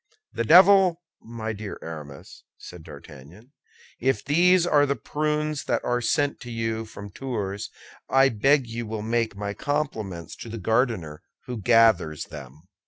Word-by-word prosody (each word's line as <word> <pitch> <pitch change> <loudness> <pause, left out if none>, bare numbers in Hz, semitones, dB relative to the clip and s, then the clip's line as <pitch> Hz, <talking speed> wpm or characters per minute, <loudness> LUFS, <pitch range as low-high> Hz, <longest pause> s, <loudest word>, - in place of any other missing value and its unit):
"The - - -1
devil! 180 - +6 0.2
my 110 -1 -5
dear 105 -1 -7
Aramis," 75 -4 -10
said 90 -2 -11
D'Artagnan, 80 - -14 0.5
"if 130 +2 0
these 175 +4 +4
are 145 -4 +3
the 140 - 0
prunes 150 +3 -2
that - - -1
are 120 0 0
sent 145 +4 0
to 120 - -10
you 115 -1 -3
from 100 -2 -10
Tours, 105 -5 -4 0.4
I 135 0 +5
beg 135 +4 +2
you 115 0 -6
will 110 -1 -5
make 115 -1 -1
my 100 0 -4
compliments 110 - -3
to 115 - -9
the 115 - -6
gardener 110 - -1 0.2
who 125 -2 -5
gathers 110 -9 +3
them." 70 +4 -11
115 Hz, 150 wpm, -25 LUFS, 100-140 Hz, 0.5 s, devil